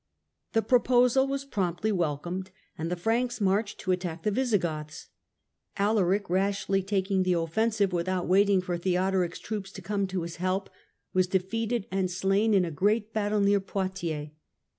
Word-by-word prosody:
The 225 - +2
proposal 250 +2 +4
was 275 0 -3
promptly 195 -3 -1
welcomed 175 +1 -2 0.3
and 160 +1 -4
the 180 - -1
Franks 235 +7 0
marched 205 +1 0
to 185 - -1
attack 175 -3 -2
the 210 - +1
Visigoths. 170 -11 -1 0.7
Alaric, 200 -1 +2
rashly 195 +1 +1
taking 190 0 0
the 185 -1 +2
offen 170 +7 +1
sive 205 -4 0
without 180 +1 -1
waiting 195 +1 +4
for 175 -1 -3
Theodoric's 185 0 0
troops 205 -3 -5
to 195 - -8
come 200 +1 -1
to 185 -2 -3
his 170 0 -6
help, 185 +2 -1 0.4
was 185 0 +3
defeated 215 +4 -1
and 190 -1 0
slain 195 +4 +2
in 185 -2 +4
a 165 - -4
great 210 +7 +1
battle 210 -1 +1
near 200 0 +4
Poitiers. 185 -6 -3
195 Hz, 160 wpm, -28 LUFS, 180-210 Hz, 0.7 s, proposal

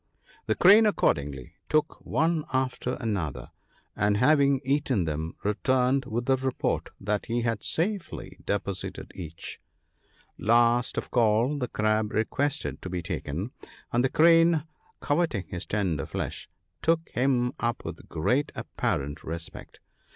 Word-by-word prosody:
"The - - +2
Crane 210 +4 +7
accordingly 70 - 0 0.2
took 155 0 0
one 160 0 +1
after 130 -1 -1
another, 100 - -3 0.4
and 105 0 +2
having 140 +2 +4
eaten 135 - +1
them 80 +1 -3
returned 130 +5 +2
with 120 +2 -2
the 135 0 +3
report 130 -1 -1
that 105 +1 -2
he 120 +1 0
had 115 -3 -1
safely 190 +3 -2
deposited 100 -1 -3
each. 85 -2 -7 0.8
Last 120 +3 +3
of - - -2
all, 120 +4 +3
the 125 - -1
Crab 110 -1 0
requested 140 +7 -1
to 90 - -6
be 90 -1 -3
taken; 85 - -4 0.4
and 120 +1 +3
the 130 - +2
Crane, 165 0 +5 0.4
coveting 145 - 0
his 90 -1 -5
tender 90 -9 -1
flesh, - - -4 0.3
took 165 0 +1
him 125 -1 +1
up 120 0 -2
with - - -8
great 125 - +1
apparent 70 +2 -2
respect. 85 +1 -7
120 Hz, 130 wpm, -27 LUFS, 100-140 Hz, 0.8 s, Crane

